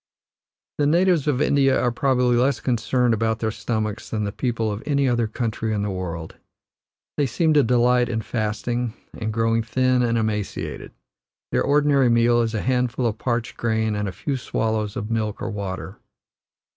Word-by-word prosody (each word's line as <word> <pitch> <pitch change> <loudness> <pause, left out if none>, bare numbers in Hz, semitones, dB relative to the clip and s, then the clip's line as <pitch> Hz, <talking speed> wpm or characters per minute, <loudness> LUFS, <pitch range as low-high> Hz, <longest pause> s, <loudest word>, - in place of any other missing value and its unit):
The 145 - +3
natives 170 -1 +3
of 145 -1 +2
India 135 -2 +3
are 120 - +1
probably 125 -2 +2
less 130 +3 +2
concerned 125 0 +1
about 110 0 0
their 110 -1 -1
stomachs 110 -1 -3
than 110 -2 -2
the 100 - -2
people 115 -1 -1
of 105 +1 -5
any 140 -2 +1
other 120 -2 +1
country 110 -1 -2
in 100 - -1
the 105 - -2
world. 85 -3 -5 0.8
They 145 - +2
seem 155 +6 +1
to 150 - +6
delight 125 0 +3
in 110 -2 -2
fasting, 115 +2 -2 0.2
and 110 -1 -3
growing 115 +1 +1
thin 130 +2 +1
and 115 -1 +1
emaciated; 110 -2 -3 0.6
their - - +2
ordinary 140 -2 +3
meal 120 0 +4
is 115 -1 -1
a 105 - -1
handful 125 -1 0
of 110 -2 -1
parched 120 -2 -2
grain 110 -2 0
and 105 0 -2
a - - -5
few 130 - -3
swallows 110 -3 -2
of 105 +2 -4
milk 110 -2 -1
or 115 - -4
water. 95 -2 -5
115 Hz, 175 wpm, -23 LUFS, 110-125 Hz, 0.8 s, to